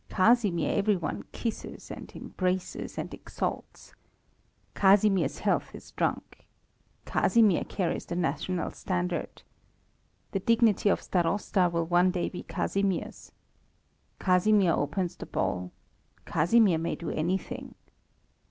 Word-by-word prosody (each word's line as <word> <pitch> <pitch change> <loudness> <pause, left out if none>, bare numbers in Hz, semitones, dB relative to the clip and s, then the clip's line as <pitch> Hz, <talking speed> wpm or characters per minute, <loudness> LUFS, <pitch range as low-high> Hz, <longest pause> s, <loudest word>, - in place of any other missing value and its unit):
Casimir 205 -3 +3
every 205 +1 +3
one 170 -4 -4
kisses 230 -2 -5
and - - -9
embraces 185 0 -3
and - - -4
exalts. - - -5 0.8
Casimir's 195 0 +3
health - - 0
is - - -12
drunk. - - -3 0.6
Casimir 220 -7 +3
carries 180 -4 -2
the 170 - -4
national 175 +2 -1
standard. 180 -1 -3 0.9
The 195 - -1
dignity 225 -1 +3
of - - +1
Starosta 180 +1 +1
will 170 -1 0
one 175 +2 +3
day 180 -1 -1
be 180 - -7
Casimir's. 195 -2 -2 0.9
Casimir 185 -1 +3
opens 175 +4 -1
the - - -8
ball. 90 0 -2 0.5
Casimir 185 +1 +3
may 165 - -2
do 170 - -5
anything. 175 +5 -3
185 Hz, 110 wpm, -28 LUFS, 170-205 Hz, 0.9 s, Casimir